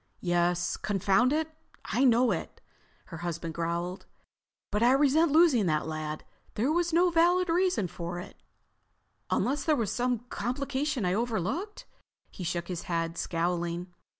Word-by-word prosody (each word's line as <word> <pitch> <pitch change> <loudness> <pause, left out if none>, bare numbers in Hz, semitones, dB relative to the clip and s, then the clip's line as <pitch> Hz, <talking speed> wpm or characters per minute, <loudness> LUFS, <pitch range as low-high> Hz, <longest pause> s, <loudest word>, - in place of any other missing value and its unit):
"Yes, 175 0 +1
confound 200 +5 +2
it, 315 +1 -1 0.3
I 255 - 0
know 245 0 +4
it," - - -4 0.5
her - - -5
husband 170 -1 -4
growled. 170 +3 -3 0.6
"But 210 +1 0
I 245 +2 +5
resent 295 +3 +4
losing 300 - +5
that 155 -2 +1
lad. 155 -1 -5 0.3
There 245 +8 +1
was 345 +1 +1
no 350 +2 +4
valid 350 +2 +3
reason 355 - +2
for 175 0 -6
it—unless 270 +8 -6
there 310 - +3
was 225 -7 -1
some 245 -1 -1
complication 270 -1 -2
I 180 - +1
overlooked." 240 - -2 0.5
He 185 - -8
shook 175 0 -2
his 180 -3 -5
head, 165 -1 -1
scowling. 175 +1 -2
215 Hz, 140 wpm, -29 LUFS, 175-290 Hz, 0.6 s, I